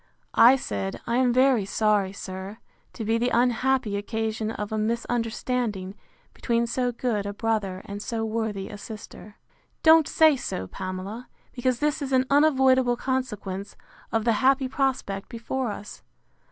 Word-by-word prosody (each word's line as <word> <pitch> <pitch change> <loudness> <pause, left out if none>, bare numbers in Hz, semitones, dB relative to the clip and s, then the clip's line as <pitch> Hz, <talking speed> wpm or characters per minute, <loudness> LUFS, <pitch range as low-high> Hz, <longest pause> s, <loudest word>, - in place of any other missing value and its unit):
I 245 +3 +7
said, 100 - -4
I 235 +1 0
am 255 -1 +3
very 255 -3 +4
sorry, 205 -1 +1
sir, 190 +1 -7 0.4
to 225 - -5
be 225 +2 +1
the 245 +1 +1
unhappy 245 -2 +1
occasion 220 +1 -2
of 210 -2 -5
a 220 - -1
misunderstanding 230 -2 -2 0.4
between 235 -1 0
so 245 +1 -1
good 225 -4 -2
a 205 - -4
brother 205 -4 -1
and 205 0 -6
so 225 -1 -3
worthy 220 -3 -2
a 205 -2 -9
sister. 210 -1 -10 0.5
Don't 320 -1 +7
say 315 -2 +5
so, 95 - -4
Pamela, 190 - -6 0.2
because 255 0 0
this 300 +3 0
is 270 -1 -3
an 260 0 +4
unavoidable 265 -4 +4
consequence 210 -7 -3 0.4
of 225 -1 0
the 230 - +4
happy 265 0 +3
prospect 255 -7 -2
before 235 +1 -3
us. 205 0 -9
230 Hz, 150 wpm, -25 LUFS, 205-255 Hz, 0.5 s, I